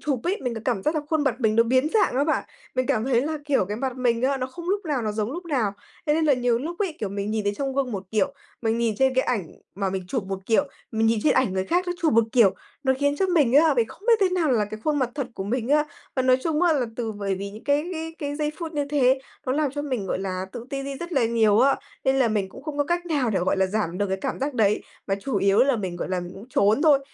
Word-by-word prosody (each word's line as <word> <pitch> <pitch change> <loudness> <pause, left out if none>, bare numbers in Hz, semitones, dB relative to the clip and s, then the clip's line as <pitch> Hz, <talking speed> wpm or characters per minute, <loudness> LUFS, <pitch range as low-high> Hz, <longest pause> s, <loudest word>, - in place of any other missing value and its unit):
chụp 275 -6 -1
ấy, 375 +4 0
mình 245 -2 -2
có 225 - -5
cảm 230 -7 0
giác 305 - +1
là 310 - +1
khuôn 315 -2 +2
mặt 260 -4 +2
mình 220 -1 +2
nó 230 - +7
biến 260 +5 +2
dạng 435 - +3
á 280 - +3
bạn, 310 - 0 0.3
mình 255 0 0
cảm 245 -5 +1
thấy 250 -3 +3
là, 310 +1 -2
kiểu, 280 -9 +2
cái 205 +3 -4
mặt 260 0 -3
mình 240 -2 +1
á, 270 +1 +2
nó 255 -1 -2
không 345 +6 -8
lúc 400 0 0
nào 285 -6 -1
nó 215 -1 -1
giống 215 +4 -2
lúc 350 +3 -6
nào. 255 -11 0 0.3
Thế 295 - +3
nên 320 0 +2
là 290 -3 +5
nhiều 245 -2 +1
lúc 335 +6 -5
ấy, 380 -7 -2
kiểu, 210 - -1
mình 200 +1 -3
nhìn 215 -1 -1
thấy 205 0 0
trong 270 +2 -3
gương 270 -3 0
một 195 -2 -4
kiểu, 275 +6 +1 0.3
mình 225 +1 +1
nhìn 230 -2 +1
trên 265 -1 +3
cái 260 - +2
ảnh 200 -10 -1 0.3
mà 195 -1 -1
mình 190 -1 -3
chụp 240 -7 -2
một 195 0 -4
kiểu, 230 +5 +3 0.3
mình 225 0 +2
nhìn 225 -1 +3
trên - - +4
ảnh 260 -7 +2
người 190 0 -1
khác 355 - +1
nó 355 - 0
chụp 315 - +3
một 230 0 +5
kiểu, 230 -7 +5 0.3
nó 265 - +3
khiến 285 0 +1
cho 380 - +2
mình 305 -9 +3
á, 300 0 +6
mình 230 -2 +2
không - - -14
biết 465 - +8
thế 385 - +4
nào 355 -6 +1
là 215 -3 +2
cái 215 +1 -8
khuôn 300 -1 +1
mặt 255 -3 0
thật 275 -4 -2
của 190 - -4
mình 235 +3 -2
á. 300 +1 +4 0.3
Và 260 - +2
nói 255 0 +5
chung 320 +2 0
á, 345 - +5
là 270 -5 +1
từ 225 -3 -2
bởi 200 -2 -2
vì 200 +1 -5
những 215 +2 -12
cái 290 +2 +2
cái 325 -1 -5
cái 290 -1 -3
giây 300 0 -1
phút 335 -2 -5
như 290 -2 0
thế, 265 -2 +3 0.3
nó 255 - +1
làm 295 -1 +1
cho 290 +1 -4
mình, 255 -9 -3
gọi - - -1
là, 190 -1 -3
tự 235 - -7
ti 275 0 -3
đi 275 0 -5
rất 345 +1 -6
là 260 -6 +3
nhiều 225 -2 +3
á, 275 +2 +4 0.3
nên 265 0 +3
là 260 -3 +3
mình 205 -3 0
cũng 265 - -12
không 300 -1 -5
có 290 - +3
cách 345 +2 -1
nào 280 -8 +1
để, 195 - +1
gọi 185 - +1
là, 190 - +3
giảm 185 -3 -2
được 205 - +1
cái 190 - 0
cảm - - -3
giác 280 0 -1
đấy, 210 -3 +2 0.2
mà 195 - +1
chủ 270 -2 -2
yếu 195 +1 +3
là 270 -2 +4
mình, 185 -4 -4
gọi - - -4
là, 185 -1 -1
mình 175 +1 -7
cũng, 210 +5 -11
trốn 220 +2 +3
thôi. 300 -4 +6
255 Hz, 310 wpm, -24 LUFS, 215-290 Hz, 0.3 s, biết